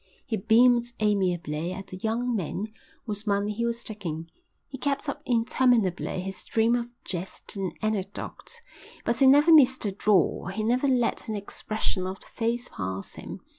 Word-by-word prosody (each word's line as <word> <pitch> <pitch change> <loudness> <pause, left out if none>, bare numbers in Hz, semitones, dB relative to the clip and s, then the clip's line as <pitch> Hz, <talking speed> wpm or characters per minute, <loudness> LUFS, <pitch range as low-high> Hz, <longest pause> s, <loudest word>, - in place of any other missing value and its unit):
He 240 - -1
beamed 235 +3 +4
amiably 180 -6 0
at 195 +1 -6
the 185 - -8
young 230 +4 -1
men 190 0 -2 0.4
whose 210 -1 -4
money 200 +1 +1
he 235 +3 -1
was 235 0 -2
taking. 165 -7 -6 0.4
He 265 - -8
kept 285 +1 -1
up 280 - -3
interminably 230 -6 +2
his 190 +1 -5
stream 225 +1 +1
of 240 -1 0 0.2
jest 185 +3 -5
and 195 -2 -3
anecdote, 215 - -4 0.4
but 235 - +1
he 270 - +6
never 295 +5 +7
missed 260 -6 +6
a 205 - 0
draw, 195 -2 +2
he 195 +4 -3
never 250 +5 +2
let 250 -2 +1
an 220 - -2
expression 205 -2 -3
of 190 +1 -5
the - - -19
face 235 +2 -2
pass 95 0 -5
him. - - -8
215 Hz, 170 wpm, -27 LUFS, 190-240 Hz, 0.4 s, never